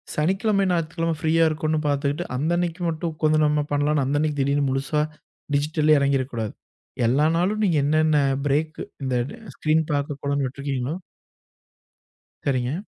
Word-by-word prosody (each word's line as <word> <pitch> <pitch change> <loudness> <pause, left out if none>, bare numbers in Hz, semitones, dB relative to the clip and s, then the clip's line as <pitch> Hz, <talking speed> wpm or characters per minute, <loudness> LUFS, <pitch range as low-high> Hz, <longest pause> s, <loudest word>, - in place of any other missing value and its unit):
சனிக்கிழம 195 +6 +1
ஞாயிற்றுக்கிழம 165 -1 -1
ஃப்ரீயா 160 +1 +3
இருக்குன்னு 155 0 -1
பாத்துக்கிட்டு 145 +3 0
அந்த 155 +6 0
அன்னைக்கி 175 0 -2
மட்டும், 160 0 -3
கொஞ்சம் 155 0 +4
நம்ம 150 0 +2
பண்ணலாம் 145 0 +2
அந்த 140 +2 0
அன்னைக்கி 150 -1 0
திடீர்னு 140 +1 +1
முழுசா 135 +3 0 0.5
டிஜிட்டல்லயே 155 +1 +3
எறங்கிற 140 -1 +2
கூடாது. 110 -3 -3 0.5
எல்லா 140 +5 +3
நாளும் 205 +5 +1
நீங்க 170 -5 +2
என்னென்ன 155 0 +3 0.3
பிரேக் 155 +3 0 0.3
இந்த 130 -1 0 0.4
ஸ்க்ரீன் 155 +1 +2
பார்க்கக் 145 0 -2
கூடாதுன்னு 140 -1 0
விட்ருக்கீங்களோ 140 +2 -3 1.5
சரிங்க. 130 +4 0
150 Hz, 135 wpm, -24 LUFS, 140-160 Hz, 1.5 s, கொஞ்சம்